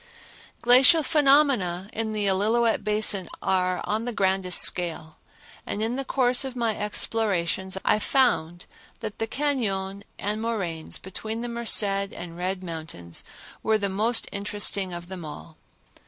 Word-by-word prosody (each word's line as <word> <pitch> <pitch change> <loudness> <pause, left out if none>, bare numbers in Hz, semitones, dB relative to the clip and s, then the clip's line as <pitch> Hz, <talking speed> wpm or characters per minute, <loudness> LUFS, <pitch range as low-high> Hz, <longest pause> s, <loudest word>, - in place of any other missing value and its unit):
Glacial 260 +7 +7
phenomena 275 - +3
in 220 0 -2
the 210 -1 -2
Illilouette 220 +4 +1
Basin 210 -3 +1
are 185 -1 0
on 220 +2 -2
the 245 - -2
grandest 190 -3 +2
scale, 165 -2 0 0.5
and 210 - -3
in 230 +2 -1
the 275 - -3
course 255 -1 +2
of 265 -2 -6
my 230 -3 0
explorations 190 -3 -1
I - - +3
found 175 - +1 0.4
that 220 -2 -6
the 225 - -1
cañon 205 -9 -2 0.2
and 210 +2 -3
moraines 185 -9 -2
between 220 +4 -6
the 240 - -4
Merced 235 -2 +4
and 195 -4 -3
Red 185 +2 -3
Mountains 160 - -6 0.4
were 220 0 +2
the 200 -2 -2
most 225 +4 0
interesting 200 -2 0
of 175 0 -7
them 185 -2 -8
all. 155 +1 -9
205 Hz, 140 wpm, -25 LUFS, 185-230 Hz, 0.5 s, Glacial